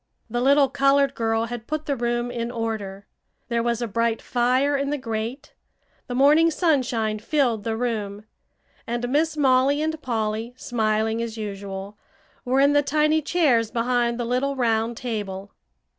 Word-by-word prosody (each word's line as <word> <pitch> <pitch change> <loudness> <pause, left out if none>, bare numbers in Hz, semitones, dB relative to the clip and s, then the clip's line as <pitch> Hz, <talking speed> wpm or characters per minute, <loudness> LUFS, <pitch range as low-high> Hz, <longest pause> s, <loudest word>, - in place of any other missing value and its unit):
The 240 +1 -1
little 280 +2 +5
colored 275 0 +3
girl 225 -1 0
had 235 -1 -7
put 310 0 -3
the 285 - -1
room 240 0 -1
in 235 -1 -3
order; 220 -4 -4 0.4
there 235 -1 +1
was 235 0 -1
a - - -2
bright 230 +1 0
fire 255 +4 +1
in 280 0 -1
the 295 - -1
grate, 235 +3 -5 0.5
the 245 - -4
morning 300 +5 +5
sunshine 255 - 0
filled 235 -3 0
the 225 0 -2
room, 215 -4 -3 0.6
and 240 +1 -2
Miss 305 +3 +1
Molly 270 0 +3
and 315 0 -2
Polly, 225 -1 -2
smiling 220 -2 0
as 230 -1 -5
usual, 200 -1 -6 0.4
were 260 0 +1
in 280 +1 +5
the 290 - +5
tiny 305 +2 +2
chairs 275 -9 +2
behind 240 0 0
the 240 - -1
little 255 +4 0
round 230 -2 0
table. 205 -5 -5
240 Hz, 160 wpm, -24 LUFS, 225-275 Hz, 0.6 s, little